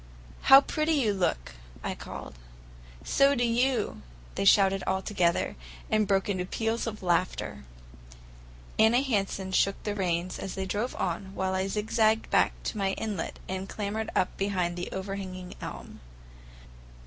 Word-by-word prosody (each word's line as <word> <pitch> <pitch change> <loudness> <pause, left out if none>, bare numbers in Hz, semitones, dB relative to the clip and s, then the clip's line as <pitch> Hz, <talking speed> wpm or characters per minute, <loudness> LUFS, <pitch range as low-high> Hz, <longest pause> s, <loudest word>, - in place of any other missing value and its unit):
"How 270 +1 +11
pretty 310 +3 0
you 245 -9 +2
look!" 60 - -1 0.3
I - - -2
called. - - -8 0.7
"So 275 +1 +4
do 245 - +1
you!" 240 0 +1 0.3
they - - -2
shouted 195 -1 +5
altogether, 190 -2 +1 0.4
and 215 -1 +3
broke 195 -1 +2
into 185 -3 -1
peals 225 +5 -2
of 215 -3 -5
laughter. 175 - -1 1.1
Anna 235 +4 +5
Hansen 195 -6 -1
shook 195 +1 +1
the 210 - -2
reins 180 -2 -1
and - - -5
they 190 0 -3
drove 210 +6 -2
on, 195 0 -3
while 190 0 -1
I 190 +1 0
zigzagged 220 +2 +1
back - - +4
to 215 - -3
my 195 -1 +1
inlet 205 -6 -4
and 190 +1 -4
clambered 215 +1 -3
up 180 - +1
behind 180 -3 -1
an 175 - -3
overhanging 190 -1 -5
elm. - - -8
195 Hz, 145 wpm, -28 LUFS, 185-220 Hz, 1.1 s, How